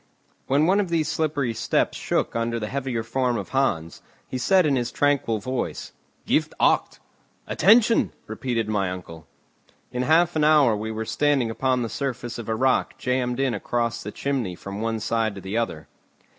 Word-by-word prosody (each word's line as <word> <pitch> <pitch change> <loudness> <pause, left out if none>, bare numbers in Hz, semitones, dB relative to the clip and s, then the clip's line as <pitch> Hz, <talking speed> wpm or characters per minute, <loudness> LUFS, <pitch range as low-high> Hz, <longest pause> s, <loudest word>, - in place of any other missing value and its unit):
When 140 +3 +3
one 190 +4 +3
of 195 -4 0
these 165 -3 +1
slippery 145 -7 -1
steps 110 - 0
shook - - -1
under 115 0 -1
the 105 -1 -4
heavier 130 -4 -2
form 125 +1 0
of - - -5
Hans, 85 -12 -1 0.3
he 130 - -4
said 185 +7 +4
in 145 -2 +2
his 120 -2 -1
tranquil 140 -6 +1
voice: 130 - -4 0.3
"Gif - - +2
akt!" - - +2 0.5
"Attention!" 225 +5 +4
repeated 115 0 -2
my 100 -3 0
uncle. 85 -4 -8 0.6
In 125 - -2
half 165 +5 +3
an 155 - +2
hour 150 -7 +5
we 110 +1 -4
were 110 0 -4
standing 140 -3 +1
upon 130 +1 0
the - - -2
surface 120 -2 -4
of 115 - -7
a 110 - +1
rock 130 +3 +1
jammed 125 -1 -1
in 135 -3 +1
across 115 +2 -2
the 105 - -6
chimney 125 -10 -2
from 100 +3 -7
one 115 0 -1
side 110 -1 -1
to 95 - -8
the 95 +3 -5
other. 115 -10 -2
120 Hz, 180 wpm, -24 LUFS, 110-140 Hz, 0.6 s, hour